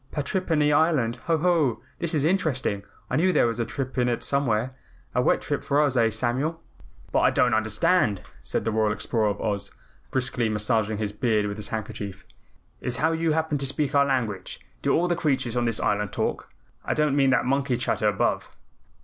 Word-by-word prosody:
Patrippany 150 -1 +1
Island. 145 -7 +2
Ho, 165 -1 +3
ho! 155 -7 +1 0.2
This 170 -1 -1
is 145 -1 +1
interesting. 145 - 0 0.3
I 125 - +1
knew 185 +4 +3
there - - +3
was 115 0 -1
a 115 - 0
trip 135 -2 -4
in 125 0 +2
it 120 - -1
somewhere, 130 -3 0 0.4
a - - +2
wet - - +2
trip - - -2
for 140 - +1
us, 145 -3 +2
eh, 115 -2 +4
Samuel?" 130 +9 -1 0.5
"But - - +3
what - - +3
I - - +6
don't - - +2
understand," 110 - +2 0.2
said - - -2
the 115 - +1
Royal 110 -1 +2
Explorer 110 0 -1
of 100 - -3
Oz, 100 -2 -2 0.4
briskly 125 -3 0
massaging 110 0 0
his 105 -1 -2
beard 105 -1 +1
with 100 0 -4
his 105 - -4
handkerchief, 105 -3 -6 0.5
"is 125 -1 -3
how 160 +4 +2
you 165 -1 +1
happen 160 -2 0
to 135 - -2
speak 140 0 -1
our 140 0 +4
language. 110 -9 -2 0.2
Do - - +1
all 175 +2 +2
the 175 - +1
creatures 135 -7 0
on 120 -1 +1
this 115 -2 -1
Island 105 -1 0
talk? - - -2 0.3
I - - -1
don't 150 -2 +2
mean 135 -2 +4
that 130 - +2
monkey 135 -1 +1
chatter - - 0
above." - - 0
125 Hz, 200 wpm, -25 LUFS, 110-150 Hz, 0.5 s, I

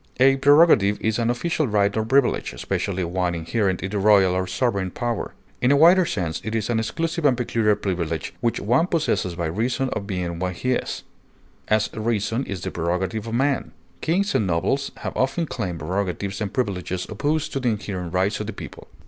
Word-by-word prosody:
A 135 +1 +5
prerogative 140 - +5
is 110 +1 0
an 115 0 +1
official 155 +4 0
right 100 -2 +2
or 110 - +1
privilege, 130 - +1
especially 90 +9 -2
one 90 0 -1
inherent 95 +3 -1
in 95 - -3
the 105 - -1
royal 100 -2 +5
or 95 0 -1
sovereign 100 -2 0
power; 120 +3 -3 0.3
in 125 - +4
a - - +6
wider 175 +3 +6
sense 85 -5 -2
it 110 +1 -3
is 110 +1 -1
an 115 - +1
exclusive 165 +8 -2
and 135 -4 +4
peculiar 115 -3 +1
privilege 85 -6 -3
which 115 - 0
one 125 - +2
possesses 150 - 0
by 85 -1 -2
reason 120 - -1
of 100 -4 -4
being 90 -4 -3
what 90 0 -2
he 125 +7 -1
is; 125 - -2 0.6
as, 110 0 +2
reason 110 +2 -1
is 95 -2 -5
the - - -4
prerogative 90 +6 -2
of 115 - -3
man; 135 +2 0 0.3
kings 195 +5 +1
and 105 - +1
nobles 115 +11 0
have - - -5
often 135 +6 0
claimed 95 - -4
prerogatives 95 +4 -3
and 100 -2 -2
privileges 95 -6 -2
opposed 145 +8 -1
to 135 - -1
the 125 -2 +1
inherent 100 -5 -4
rights 95 +3 +1
of 105 - -4
the 110 - -4
people. - - -10
105 Hz, 195 wpm, -23 LUFS, 95-130 Hz, 0.6 s, a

